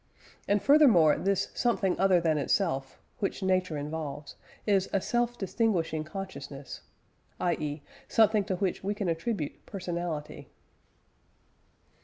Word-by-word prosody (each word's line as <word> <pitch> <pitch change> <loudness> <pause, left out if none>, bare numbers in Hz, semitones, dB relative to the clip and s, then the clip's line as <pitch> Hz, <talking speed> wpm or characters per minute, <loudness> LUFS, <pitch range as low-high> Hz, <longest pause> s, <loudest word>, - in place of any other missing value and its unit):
And, 205 0 +2
furthermore, 245 - +6
this 195 0 0
"something 210 -6 +1
other 190 -1 +5
than 160 -3 +1
itself," 140 -4 -1 0.2
which 195 0 -2
Nature 185 -4 +1
involves, 145 -1 -5 0.3
is 195 -3 +2
"a 195 - +2
self 240 +4 0
distinguishing 185 -7 0
consciousness"; 145 -5 -7 0.6
i.e. 150 -4 -1 0.2
something 220 -2 +4
to 185 - -1
which 185 0 -2
we 205 +2 -1
can 205 -2 -2
attribute 165 -1 -3
personality. 175 -5 -5
185 Hz, 115 wpm, -29 LUFS, 155-200 Hz, 0.6 s, furthermore